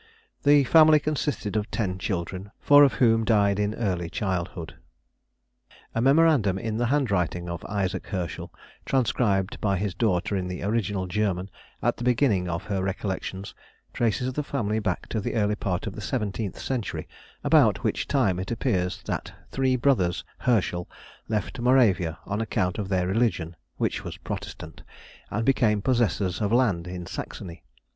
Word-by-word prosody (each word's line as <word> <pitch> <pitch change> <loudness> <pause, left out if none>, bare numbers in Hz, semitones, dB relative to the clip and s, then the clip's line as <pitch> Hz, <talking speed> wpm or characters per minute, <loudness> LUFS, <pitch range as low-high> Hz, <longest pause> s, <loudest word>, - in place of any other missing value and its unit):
The 145 -1 +5
family 155 +2 +6
consisted 145 -8 -2
of 105 0 -1
ten 95 -4 -2
children, 95 +1 -3
four 145 0 +7
of 140 - +5
whom 115 -2 +3
died 100 -3 +3
in 105 +1 0
early 90 -7 -1
childhood. 90 -6 -3 1.2
A 115 - 0
memorandum 135 - +4
in 110 +2 -3
the 120 0 +1
handwriting 100 - 0
of 85 0 -5
Isaac 100 -2 -2
Herschel, 90 -6 -4 0.3
transcribed 110 -7 0
by 100 -2 +1
his 100 0 -2
daughter 100 -2 0
in 90 -2 -2
the 90 -1 -5
original 100 -2 -1
German 95 -1 -1 0.3
at - - +1
the - - -5
beginning 120 -7 +2
of 85 0 -3
her 100 -2 -2
Recollections, 95 0 -4 0.4
traces 125 +2 0
the 150 - -1
family 110 -7 -1
back 95 -5 -2
to 110 - -1
the - - -3
early 105 -2 +2
part 95 -2 -2
of 105 - -4
the 105 - -7
seventeenth 105 -2 -3
century, 125 -6 -3 0.4
about - - +4
which - - -1
time, 105 -11 +2
it 95 - -4
appears 100 -7 -1
that - - -3 0.2
three 130 -1 +1
brothers 115 -10 +1 0.2
Herschel 95 -7 0 0.4
left 110 +2 -2
Moravia 115 -10 +3
on 100 +2 -2
account 105 -4 -1
of 100 -2 -3
their 90 -2 +1
religion 95 -5 0 0.2
(which - - -1
was - - -7
Protestant), - - -7 0.5
and 115 +2 -2
became 115 -6 +3
possessors 105 -5 0
of 105 -1 0
land 105 -9 +2
in 90 -1 -6
Saxony. 85 0 -7
105 Hz, 155 wpm, -26 LUFS, 90-120 Hz, 1.2 s, four